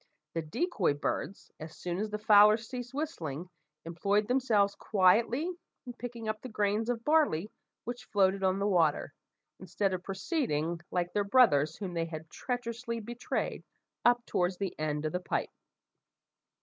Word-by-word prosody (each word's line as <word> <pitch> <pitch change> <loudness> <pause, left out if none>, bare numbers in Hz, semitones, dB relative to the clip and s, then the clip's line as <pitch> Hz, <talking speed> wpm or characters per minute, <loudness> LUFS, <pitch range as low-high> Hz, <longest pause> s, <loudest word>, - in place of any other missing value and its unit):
The 165 - -1
decoy 180 - 0
birds, 185 +6 -4
as 155 0 -9
soon 175 0 -3
as 215 +1 -2
the 210 - -3
fowler 210 0 +7
ceased 245 +2 -7
whistling, 180 - -4 0.3
employed 200 +5 0
themselves 225 -6 +2
quietly 230 - +2 0.3
in 245 - -7
picking 235 -2 -7
up 215 0 -2
the 255 - -7
grains 210 +1 0
of 235 -2 -1
barley 290 - +2 0.3
which 245 +1 -6
floated 195 -1 +2
on 190 0 +2
the 200 - -1
water, 165 -7 +2 0.5
instead 190 +1 -1
of 185 - -2
proceeding, 180 - -2
like 175 -1 -1
their 205 - +2
brothers 180 - +4
whom 190 -4 -5
they 165 -1 -1
had 160 -1 -8
treacherously 235 -1 -4
betrayed, 240 +2 -3 0.4
up 240 0 +4
towards 180 0 0
the 195 -2 -3
end 150 0 -1
of 155 - 0
the 180 - -1
pipe. 180 - -2
205 Hz, 155 wpm, -31 LUFS, 175-235 Hz, 0.5 s, fowler